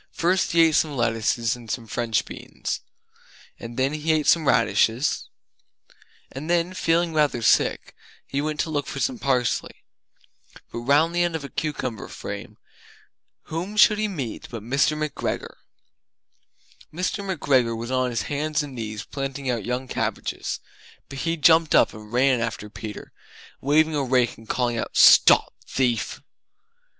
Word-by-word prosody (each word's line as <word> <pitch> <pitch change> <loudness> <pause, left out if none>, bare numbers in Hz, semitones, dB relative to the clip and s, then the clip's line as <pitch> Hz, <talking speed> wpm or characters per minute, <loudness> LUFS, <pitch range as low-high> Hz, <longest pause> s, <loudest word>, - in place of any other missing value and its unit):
First 175 +1 +1
he 170 - +5
ate 160 -1 +3
some 150 -2 +1
lettuces 115 0 0
and 120 -2 -13
some 115 0 -3
French 115 0 -1
beans - - -6 0.8
And 115 0 -8
then 135 +2 +1
He 155 +1 -1
Ate 155 -2 0
Some 160 -3 +3
Radishes 125 +1 +2 1.0
And 145 +5 -7
then, 175 +1 +1
feeling 170 -1 +1
rather 145 -6 +1
sick, - - +2 0.3
he 140 - -2
went 155 0 -3
to 160 - -3
look 145 -2 -2
for 140 - -5
some 250 - -1
parsley. 125 - -1 0.9
But - - -5
round 145 +7 +3
the 175 - +1
end 175 -1 0
of 160 - -4
a 140 - -7
cucumber 130 -8 -4
frame, - - -8 0.9
whom 180 +6 -5
should 210 0 +6
he 215 - +1
meet 140 - -5
but 115 -3 -7
Mr. 140 +6 +1
McGregor! 155 -1 -4 1.3
Mr. 185 +5 -2
McGregor 135 -11 +1
was 120 +2 -5
on 130 -1 +1
his 115 -2 -2
hands 150 +1 -1
and 145 -2 -8
knees 110 -3 -5
planting 135 -1 -4
out 115 -4 -3
young 125 +2 -2
cabbages, - - -3 0.5
but 135 0 -7
he 165 +2 -1
jumped 160 +1 +5
up - - +4
and 105 0 -12
ran 125 0 +3
after 110 -2 -4
Peter, 105 -1 -8 0.5
waving 155 +3 +3
a 145 - 0
rake 125 -2 +1
and 110 0 -17
calling 120 -2 0
out - - -4
"Stop - - +7
thief!" 125 -3 -1
140 Hz, 155 wpm, -24 LUFS, 120-160 Hz, 1.3 s, Stop